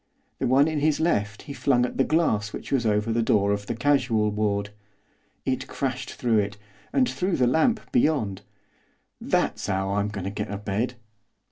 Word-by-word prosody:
The -, -, 0 dB
one 135 Hz, +4 st, +5 dB
in 155 Hz, -2 st, -1 dB
his 150 Hz, 0 st, +2 dB
left 110 Hz, -10 st, 0 dB
he 145 Hz, -, -7 dB
flung 125 Hz, -3 st, +2 dB
at -, -, -6 dB
the 135 Hz, -, +4 dB
glass 110 Hz, -11 st, +1 dB
which -, -, -7 dB
was 125 Hz, -5 st, +2 dB
over 105 Hz, +2 st, +1 dB
the 115 Hz, -, +2 dB
door 100 Hz, -3 st, +2 dB
of 100 Hz, 0 st, -2 dB
the 120 Hz, -, -2 dB
casual 120 Hz, -5 st, +2 dB
ward. 105 Hz, -1 st, -1 dB, 0.7 s
It 130 Hz, -1 st, -1 dB
crashed 130 Hz, -2 st, -3 dB
through 115 Hz, -3 st, +2 dB
it, 105 Hz, 0 st, -2 dB, 0.3 s
and 260 Hz, -2 st, +3 dB
through 185 Hz, -5 st, -1 dB
the 125 Hz, -, +3 dB
lamp 160 Hz, -, +2 dB
beyond. 145 Hz, -, +1 dB, 0.8 s
'That's -, -, 0 dB
'ow 95 Hz, 0 st, 0 dB
I'm 100 Hz, 0 st, +1 dB
goin' 100 Hz, -3 st, -5 dB
to 95 Hz, -, -3 dB
get 105 Hz, +1 st, -4 dB
a 100 Hz, -, -3 dB
bed. 105 Hz, +5 st, -2 dB
115 Hz, 190 wpm, -25 LUFS, 105-140 Hz, 0.8 s, one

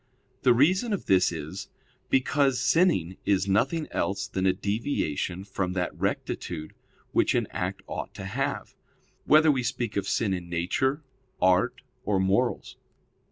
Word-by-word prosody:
The 125 Hz, -2 st, +5 dB
reason 185 Hz, -, +3 dB
of 200 Hz, -, -3 dB
this 95 Hz, -1 st, +4 dB
is, 85 Hz, +5 st, -6 dB, 0.4 s
because 135 Hz, 0 st, +2 dB
sinning 95 Hz, -, +2 dB
is 95 Hz, -1 st, +1 dB
nothing 150 Hz, -, +1 dB
else 100 Hz, 0 st, -1 dB
than 95 Hz, 0 st, -1 dB
a -, -, +5 dB
deviation 95 Hz, -, -2 dB
from 95 Hz, -2 st, -3 dB
that 90 Hz, -2 st, -2 dB
rectitude 80 Hz, -3 st, -3 dB, 0.4 s
which -, -, +2 dB
an -, -, +2 dB
act -, -, -3 dB
ought -, -, -5 dB
to 95 Hz, -, -7 dB
have; 135 Hz, +8 st, -3 dB, 0.5 s
whether 155 Hz, +1 st, +6 dB
we 130 Hz, -3 st, 0 dB
speak 120 Hz, -2 st, -3 dB
of 100 Hz, -1 st, -1 dB
sin 100 Hz, -2 st, +1 dB
in 90 Hz, -2 st, -5 dB
nature, 130 Hz, -, 0 dB, 0.4 s
art, 90 Hz, 0 st, +2 dB, 0.2 s
or 100 Hz, -2 st, +1 dB
morals. 95 Hz, +1 st, 0 dB
100 Hz, 145 wpm, -27 LUFS, 95-135 Hz, 0.5 s, whether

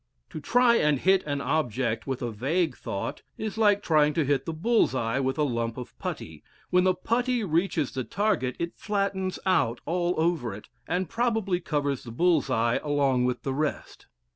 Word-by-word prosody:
To -, -, -5 dB
try 240 Hz, +7 st, +4 dB
and 150 Hz, -1 st, +3 dB
hit 190 Hz, +6 st, +3 dB
an 145 Hz, -1 st, -1 dB
object 125 Hz, -6 st, -1 dB
with 130 Hz, -2 st, -3 dB
a 120 Hz, -, -2 dB
vague 140 Hz, -, 0 dB
thought 100 Hz, -, -5 dB, 0.2 s
is 215 Hz, -1 st, -4 dB
like 205 Hz, -2 st, +3 dB
trying 150 Hz, -2 st, +3 dB
to 160 Hz, -, +2 dB
hit 135 Hz, -1 st, 0 dB
the -, -, -1 dB
bull's 215 Hz, -, +2 dB
eye 115 Hz, +1 st, 0 dB
with 130 Hz, +1 st, -1 dB
a 150 Hz, -, +2 dB
lump 115 Hz, -4 st, -1 dB
of 125 Hz, -, -8 dB
putty: 80 Hz, -2 st, -6 dB, 0.3 s
when 180 Hz, 0 st, +4 dB
the 185 Hz, -1 st, +3 dB
putty 240 Hz, +5 st, 0 dB
reaches 165 Hz, -4 st, 0 dB
the 130 Hz, -, -3 dB
target, 130 Hz, -, 0 dB
it 170 Hz, 0 st, -3 dB
flattens 195 Hz, -3 st, -1 dB
out 165 Hz, -11 st, +2 dB
all 175 Hz, +1 st, 0 dB
over 160 Hz, -, 0 dB
it, 105 Hz, -, -12 dB, 0.2 s
and 180 Hz, +1 st, -1 dB
probably 225 Hz, -4 st, 0 dB
covers 145 Hz, -5 st, -2 dB
the 120 Hz, -, -9 dB
bull's 160 Hz, +3 st, +2 dB
eye 115 Hz, -2 st, +2 dB
along 140 Hz, -4 st, +2 dB
with 125 Hz, -1 st, -2 dB
the 135 Hz, -, -2 dB
rest. 150 Hz, +2 st, -3 dB
155 Hz, 190 wpm, -27 LUFS, 130-185 Hz, 0.3 s, try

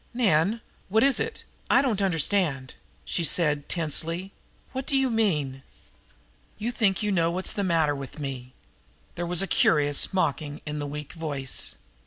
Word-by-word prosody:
"Nan, 205 Hz, -1 st, +2 dB, 0.3 s
what 220 Hz, +3 st, +3 dB
is 275 Hz, -1 st, +3 dB
it? 450 Hz, 0 st, -4 dB, 0.3 s
I -, -, +5 dB
don't 220 Hz, -7 st, 0 dB
understand!" 165 Hz, -6 st, +1 dB, 0.3 s
she 170 Hz, -, -1 dB
said 150 Hz, -2 st, +1 dB
tensely. 165 Hz, +3 st, -1 dB, 0.4 s
"What 265 Hz, 0 st, -5 dB
do 275 Hz, -, +3 dB
you 265 Hz, -2 st, +2 dB
mean?" 150 Hz, -12 st, 0 dB, 1.0 s
"You 225 Hz, +3 st, -2 dB
think 215 Hz, -4 st, +1 dB
you 210 Hz, -, 0 dB
know 170 Hz, -3 st, +2 dB
what's 185 Hz, +2 st, +2 dB
the 200 Hz, -, 0 dB
matter 165 Hz, -5 st, +2 dB
with 140 Hz, 0 st, -8 dB
me." 130 Hz, -3 st, -6 dB, 0.6 s
There 175 Hz, 0 st, -4 dB
was 180 Hz, +2 st, +1 dB
a 195 Hz, -, -1 dB
curious 145 Hz, -1 st, +4 dB
mockery 150 Hz, -5 st, -1 dB
in 150 Hz, 0 st, -4 dB
the 145 Hz, -, -3 dB
weak 150 Hz, 0 st, -7 dB
voice. 145 Hz, -6 st, -2 dB
170 Hz, 160 wpm, -26 LUFS, 145-205 Hz, 1.0 s, I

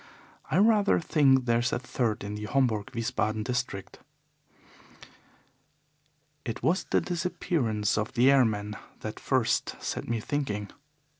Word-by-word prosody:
I -, -, +1 dB
rather 210 Hz, 0 st, +4 dB
think 135 Hz, -6 st, +3 dB
there 115 Hz, -1 st, +3 dB
is 120 Hz, -, 0 dB
a -, -, +1 dB
third 120 Hz, -4 st, -2 dB
in 100 Hz, +1 st, -5 dB
the 105 Hz, 0 st, -5 dB
Homburg 110 Hz, -4 st, +1 dB
Wiesbaden 110 Hz, -2 st, -1 dB
district. 125 Hz, -5 st, -4 dB, 2.4 s
"It 115 Hz, -1 st, -5 dB
was 175 Hz, +4 st, +2 dB
the -, -, +1 dB
disappearance 155 Hz, -, -1 dB
of 105 Hz, -, -3 dB
the 125 Hz, +3 st, +5 dB
airmen 105 Hz, -6 st, +2 dB, 0.2 s
that -, -, -6 dB
first -, -, 0 dB
set -, -, -4 dB
me 115 Hz, -1 st, -1 dB
thinking. 110 Hz, -6 st, -3 dB
120 Hz, 130 wpm, -28 LUFS, 105-140 Hz, 2.4 s, the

